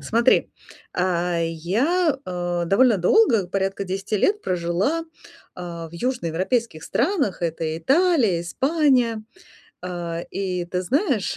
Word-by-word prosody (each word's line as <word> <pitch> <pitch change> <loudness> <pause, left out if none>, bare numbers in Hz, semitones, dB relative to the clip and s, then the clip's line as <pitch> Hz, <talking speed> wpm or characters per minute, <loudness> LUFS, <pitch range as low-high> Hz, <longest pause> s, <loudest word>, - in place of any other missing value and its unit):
Смотри, 230 - +2 0.5
э, 175 -1 0
я, 255 - +1
э, 175 -1 -2
довольно 215 +4 +4
долго, 215 - +4
порядка 195 +1 -2
10 195 +3 -2
лет 415 - +1
прожила, 185 - -1 0.5
а, 170 -2 -6
в - - -21
южноевропейских 190 - -2
странах: 275 - 0
это 160 -1 -2
Италия, 270 - +3
Испания. 255 - +1 0.6
Э, 175 -2 -4
и 185 -2 -2
ты 180 +1 -3
знаешь, 260 - 0
190 Hz, 110 wpm, -23 LUFS, 175-260 Hz, 0.6 s, довольно